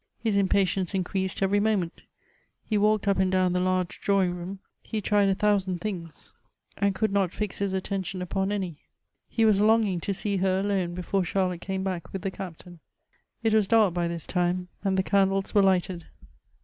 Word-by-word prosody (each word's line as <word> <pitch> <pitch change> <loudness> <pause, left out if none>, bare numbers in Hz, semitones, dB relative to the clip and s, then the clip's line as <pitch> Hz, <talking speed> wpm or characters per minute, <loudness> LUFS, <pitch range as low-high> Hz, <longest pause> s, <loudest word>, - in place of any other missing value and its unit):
His 220 -3 -1
impatience 195 -1 +1
increased 190 +1 -1
every 200 +1 +3
moment. 205 -5 0 0.6
He 215 - -1
walked 210 0 +2
up 200 -1 +2
and 190 -1 +2
down 185 -1 +2
the 180 - +1
large 185 -1 -1
drawing 195 -3 +2
room; 180 +3 -6 0.2
he 220 - -4
tried 205 -1 +2
a 195 - +2
thousand 195 -3 +1
things, 170 -5 -6 0.4
and 200 -1 +1
could 215 0 0
not 195 -3 +2
fix 210 0 -4
his 200 -1 0
attention 190 -1 -3
upon 190 +2 -1
any. 185 -6 -3 0.5
He 225 - +2
was 205 -2 +4
longing 215 -4 +3
to 200 - -2
see 200 +1 -1
her 190 0 +1
alone, 190 -4 -1
before 180 +2 -1
Charlotte 180 -1 -1
came 190 0 -3
back 185 -4 -4
with 190 -1 -5
the 195 - -1
Captain. 175 -2 -9 0.6
It 225 -1 +2
was 215 -3 +3
dark 215 -5 +4
by 175 -1 0
this 170 -2 -5
time, 180 0 -1
and 195 -1 +1
the 190 - +2
candles 195 0 +1
were 205 - +5
lighted. 185 -2 +1
190 Hz, 190 wpm, -27 LUFS, 180-200 Hz, 0.6 s, were